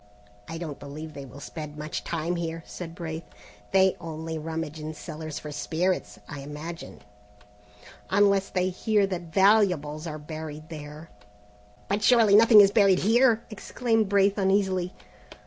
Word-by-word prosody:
"I 165 - -6
don't 160 -4 -6
believe 155 +2 -8
they 140 - -8
will 135 +2 -12
spend 150 0 -8
much 150 +1 -5
time 170 +1 -2
here," 165 -1 -4
said 165 -2 -8
Braith; 160 -2 -5 0.5
"they 190 -1 +4
only 160 -1 -5
rummage 160 -1 -5
in 155 +1 -6
cellars 155 0 -7
for 150 - -7
spirits, 175 +5 -2
I 145 - -7
imagine." 150 +4 -8 1.1
"Unless 200 0 +3
they 185 0 0
hear 205 +2 +1
that 175 -4 -5
valuables 180 -6 +3
are 155 -1 -5
buried 155 0 -8
there." 150 0 -9 0.8
"But 205 +1 -1
surely 225 -3 +5
nothing 220 0 +8
is 200 -1 +5
buried 200 -4 +5
here?" 230 +3 +3
exclaimed 225 0 -1
Braith 200 0 +3
uneasily. 190 -2 +1
170 Hz, 145 wpm, -26 LUFS, 155-195 Hz, 1.1 s, nothing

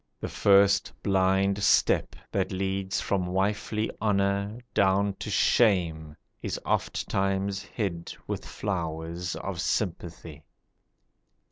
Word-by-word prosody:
(The - - -4
first 100 0 +4
blind 95 +1 +2
step 100 - +3 0.2
That 95 -1 0
leads 95 0 -1
from 95 -3 0
wifely 105 +3 -1
honour 100 0 +1 0.2
down 100 +1 +3
to - - -5
shame, 85 -8 +2 0.3
Is - - -3
ofttimes 95 0 -1
hid 95 -5 -4
with - - -4
flowers 85 -2 -4
of 95 -3 -4
sympathy.) 85 -7 -3
95 Hz, 100 wpm, -27 LUFS, 90-100 Hz, 0.3 s, first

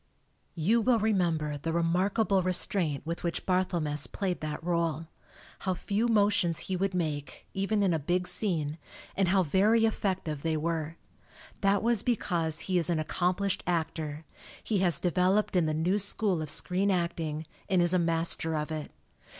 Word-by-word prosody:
You 200 +8 +2
will 245 +1 +3
remember 170 -9 0
the 165 +3 -3
remarkable 185 +5 +2
restraint 175 -5 0
with 170 +1 -4
which 170 -1 -3
Barthelmess 170 -5 +1
played 190 -3 -3
that 155 +1 -4
role 165 -2 0 0.5
how 185 -1 -1
few 210 +6 -1
motions 205 -6 +2
he 190 - -3
would 190 +1 -1
make, 150 -5 -3
even 200 +2 0
in 185 -3 +3
a 160 - +1
big 180 +5 0
scene, 160 -7 -1 0.4
and 195 -1 +2
how 190 +1 +3
very 200 +8 +3
effec 205 -4 0
tive 150 -3 -4
they 160 0 0
were. 160 0 -2 0.6
That 195 0 +2
was 230 -2 +3
because 170 -10 -1
he 185 -2 +1
is 170 - -1
an 170 - +1
accomplished 180 +5 0
actor 160 -3 -2 0.4
he 210 -3 0
has 175 -5 +2
developed 185 +4 +1
in 175 -3 +3
the - - +1
new 180 +6 +1
school 200 -3 0
of 155 - -4
screen 185 +6 -1
acting, 165 -4 -1 0.2
and 190 -2 +3
is 175 0 +3
a 185 - +4
master 165 -1 +1
of 150 +1 -3
it. 155 -2 -4
175 Hz, 165 wpm, -29 LUFS, 160-195 Hz, 0.6 s, a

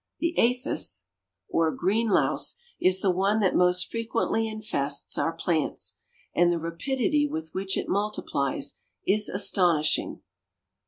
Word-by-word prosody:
The 335 0 -1
APHIS 235 - +1 0.4
or 165 -1 +1
green 210 +8 0
louse 210 - +2 0.2
is 185 0 +4
the 190 - +3
one 195 +4 +1
that 190 - +2
most 180 0 +4
frequently 230 0 -1
infests 210 -10 -2
our 165 - 0
plants, 165 -2 -2 0.4
and 175 0 +4
the 170 - +1
rapidity 265 - 0
with 160 - -5
which 190 0 -2
it - - -2
multiplies, 145 -9 -1 0.3
is 210 +2 +3
astonishing. 175 -5 +2
185 Hz, 125 wpm, -26 LUFS, 165-215 Hz, 0.4 s, is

